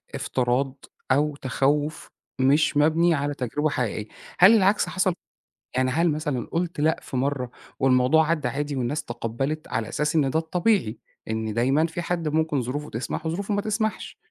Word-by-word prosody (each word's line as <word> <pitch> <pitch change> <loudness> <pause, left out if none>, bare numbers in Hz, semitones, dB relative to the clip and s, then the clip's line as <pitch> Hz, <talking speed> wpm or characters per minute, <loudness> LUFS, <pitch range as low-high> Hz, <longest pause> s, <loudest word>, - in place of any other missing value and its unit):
افتراض 130 +2 -1 0.3
أو 145 +2 +2
تخوّف 145 +3 -1 0.3
مش 145 +3 +3
مبني 160 +3 +4
على 145 -1 -1
تجربة 145 +4 -1
حقيقية، 110 -6 -2 0.3
هل 190 +5 +8
العكس 200 0 +3
حصل؟ 185 -1 +1 0.6
يعني 130 0 +2
هل 165 +4 +2
مثلًا 150 -5 -2
قُلت 170 -1 -2
لأ 155 +2 +2
في 130 - -5
مرة 130 -2 -1 0.3
والموضوع 135 +4 +4
عدّّى 165 -2 +1
عادي 145 0 -3
والناس 135 +4 -2
تقبّلِت؟ 135 +6 -3
على 110 -1 -2
أساس 150 +2 -1
إن 145 -4 +3
ده 160 - +1
الطبيعي، 170 - 0 0.3
إن 110 -1 -2
دايمًا 135 +8 +2
في 165 +1 -5
حد 170 -1 -2
ممكن 155 -2 +1
ظروفه 145 +5 -4
تسمح 120 +7 -4
و - - 0
ظروفه 195 +5 -2
ما 205 - +1
تسمحش. 215 +1 -2
150 Hz, 165 wpm, -25 LUFS, 130-160 Hz, 0.6 s, هل